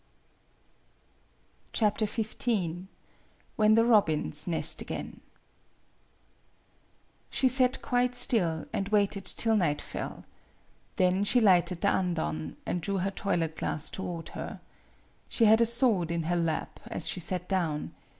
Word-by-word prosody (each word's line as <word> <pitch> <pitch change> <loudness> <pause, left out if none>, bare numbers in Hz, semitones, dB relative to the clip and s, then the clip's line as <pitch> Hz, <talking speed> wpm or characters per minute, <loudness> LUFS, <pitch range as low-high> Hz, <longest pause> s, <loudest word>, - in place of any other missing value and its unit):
XV 215 0 0 1.3
WHEN 215 0 +4
THE 230 0 +4
ROBINS 160 -9 +2
NEST 165 -2 +2
AGAIN - - -7 2.1
SHE 265 - +2
sat 255 0 +2
quite 245 0 0
still, 170 -10 +3
and 195 0 -2
waited 200 -2 +1
till 225 +3 +1
night 155 -8 +1
fell. - - -7 0.7
Then 185 +2 +2
she 215 +5 +3
lighted 180 -4 +3
the 200 - +3
andon, 80 - -2
and 175 - -2
drew 200 +3 -2
her 190 +1 -1
toilet 165 -5 -2
glass 150 - -3
toward 175 -3 -6
her. - - -7 0.7
She 230 - +2
had 220 +2 +6
a 230 - +4
sword 230 -8 +2
in 170 -1 -1
her 175 +2 -1
lap 165 -2 -2
as 170 - -1
she - - -1
sat 180 +1 -3
down. 165 -6 -2
190 Hz, 125 wpm, -28 LUFS, 170-220 Hz, 2.1 s, had